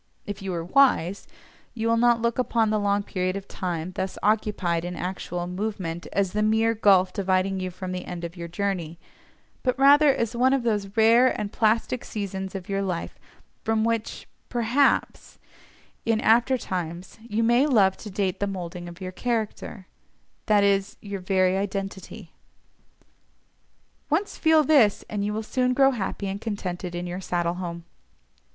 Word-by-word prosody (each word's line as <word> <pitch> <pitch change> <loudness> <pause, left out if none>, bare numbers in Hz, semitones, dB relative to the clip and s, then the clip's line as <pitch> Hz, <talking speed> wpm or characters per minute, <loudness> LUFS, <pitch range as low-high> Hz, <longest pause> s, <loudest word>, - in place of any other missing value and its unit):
If 205 -1 -6
you 195 -1 -4
are 165 -1 -3
wise, 200 -5 +2 0.5
you 225 -1 -1
will 230 - +3
not 235 0 +3
look 235 +1 0
upon 230 -3 +1
the 215 - +1
long 200 0 +1
period 185 -1 -2
of 200 0 -6
time 175 -1 -4
thus 190 +1 -4
occupied 205 -5 +1
in 175 0 -5
actual 180 -1 -4
movement 180 -2 -4
as 195 -2 0
the 210 - 0
mere 220 +1 +3
gulf 195 -4 +4
dividing 190 -1 0
you 185 0 -3
from 185 +1 -6
the 180 0 -5
end 175 -1 -6
of 170 +1 -6
your 170 -1 -6
journey, 175 -2 -3 0.6
but 255 -1 0
rather 285 +2 +6
as 235 -2 -2
one 255 +2 +3
of 270 -3 +1
those 210 -3 -2
rare 230 +3 +5
and 205 -1 -3
plastic 230 +3 +1
seasons 195 -2 -5
of 185 -2 -6
your 195 0 -1
life 180 -4 -4 0.4
from 220 -1 +1
which, 230 -1 -2 0.2
perhaps, 245 +4 +1 0.7
in 225 -1 +1
after 240 +4 +3
times 180 -3 -5
you 225 0 -2
may 240 +5 +4
love 200 -9 +4
to 215 - -9
date 190 -1 -2
the 200 - 0
moulding 175 -2 -6
of 175 +2 -13
your 185 0 -5
character—that 215 -1 -3
is, 200 0 +1
your 200 -1 -6
very 185 0 +2
identity. 195 -1 -5 1.8
Once 340 +7 0
feel 320 -1 +4
this, 260 -9 +4
and 205 -1 -2
you 205 - -1
will 215 +1 -3
soon 250 +3 0
grow 270 0 +5
happy 205 -4 -3
and 195 +2 -4
contented 185 -5 -4
in 175 +1 -4
your 180 +2 -5
saddle 175 -2 -1
home. 170 -2 -6
200 Hz, 165 wpm, -25 LUFS, 185-230 Hz, 1.8 s, rather